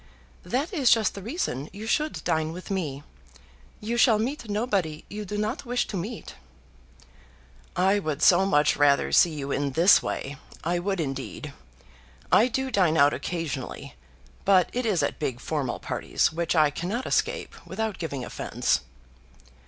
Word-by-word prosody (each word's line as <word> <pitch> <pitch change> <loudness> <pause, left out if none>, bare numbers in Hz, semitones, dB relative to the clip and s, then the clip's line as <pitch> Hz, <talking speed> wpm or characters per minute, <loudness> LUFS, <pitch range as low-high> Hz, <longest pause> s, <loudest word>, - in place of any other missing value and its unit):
"That 270 - -2
is 275 -8 +3
just 225 -3 +4
the 200 - -8
reason 190 - -3
you 205 +3 -8
should 300 +7 -1
dine 160 0 0
with 180 +3 -8
me. 150 -8 -3 0.8
You 230 +2 -3
shall 235 -3 +5
meet 240 +1 -3
nobody 200 -8 -1
you 210 0 -6
do 205 +2 -4
not 215 +6 -2
wish 245 -1 0
to - - -6
meet." 210 +6 -5 1.4
"I 190 +3 +3
would 155 -7 -3
so 185 +1 +6
much 150 -4 +3
rather 145 -1 +3
see 175 - +6
you 140 -1 -4
in 140 -1 -1
this 170 +7 +6
way, 135 +1 -4 0.3
I 175 +2 0
would 195 +1 -2
indeed. 140 0 -4 0.8
I 230 - +6
do 265 +2 -2
dine 180 -7 +3
out 145 0 +5
occasionally, 155 - -4 0.5
but 190 -2 +4
it 245 -1 -1
is 180 -8 +2
at - - -2
big 130 -5 -2
formal 140 -3 -2
parties, - - -1
which 170 +1 -1
I 155 -2 +4
cannot 195 - -3
escape - - -1
without 220 +1 -3
giving 140 -7 -4
offence." - - -1
180 Hz, 160 wpm, -26 LUFS, 150-220 Hz, 1.4 s, so